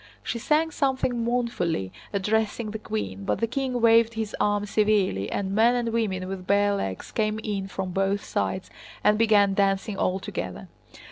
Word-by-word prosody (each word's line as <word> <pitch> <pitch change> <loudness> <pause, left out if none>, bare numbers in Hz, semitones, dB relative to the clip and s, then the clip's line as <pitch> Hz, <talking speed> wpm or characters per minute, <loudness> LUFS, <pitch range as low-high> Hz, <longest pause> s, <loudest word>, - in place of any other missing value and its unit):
She 235 - -3
sang 310 +6 +2
something 260 -5 0
mournfully, 230 - -1 0.2
addressing 215 +2 0
the 220 - -5
queen, 100 - -4
but - - -1
the 230 - +2
king 255 +1 -2
waved 230 0 +5
his 220 -1 -3
arm 205 0 +1
severely, 205 - +1
and 195 -1 -2
men 230 +4 +4
and 240 -1 0
women 205 -5 -1
with 190 -1 -6
bare 205 +1 +3
legs 95 - -4
came 215 -1 0
in 200 -3 -2
from 190 -1 -4
both 195 +2 0
sides 185 0 -2 0.3
and 210 0 +4
began 205 -3 +4
dancing 195 +1 +1
all 185 -1 +1
together. 190 - -6
210 Hz, 165 wpm, -26 LUFS, 195-230 Hz, 0.3 s, waved